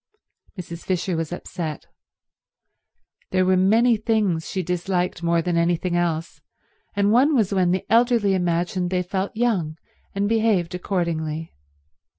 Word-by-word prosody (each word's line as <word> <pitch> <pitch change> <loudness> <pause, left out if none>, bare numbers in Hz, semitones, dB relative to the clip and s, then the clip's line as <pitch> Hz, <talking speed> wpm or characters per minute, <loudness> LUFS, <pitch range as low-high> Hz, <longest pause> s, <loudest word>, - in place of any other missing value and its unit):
Mrs. 170 -1 -7
Fisher 185 -1 -1
was 165 -1 -3
upset. 170 -3 -5 1.4
There 185 0 +2
were 185 0 +3
many 220 +6 +4
things 210 -7 0
she 185 - -2
disliked 180 0 -1
more 170 -1 +1
than 175 0 0
anything 175 +1 +1
else, 170 -2 -2 0.5
and 200 0 +2
one 270 +6 +4
was 210 -5 +2
when 185 -2 +2
the 185 +1 0
elderly 230 -3 +3
imagined 175 0 0
they 180 0 0
felt 190 +3 -3
young 195 -10 0 0.4
and 200 +1 0
behaved 215 -6 +1
accordingly. 165 -4 -2
180 Hz, 135 wpm, -23 LUFS, 170-205 Hz, 1.4 s, many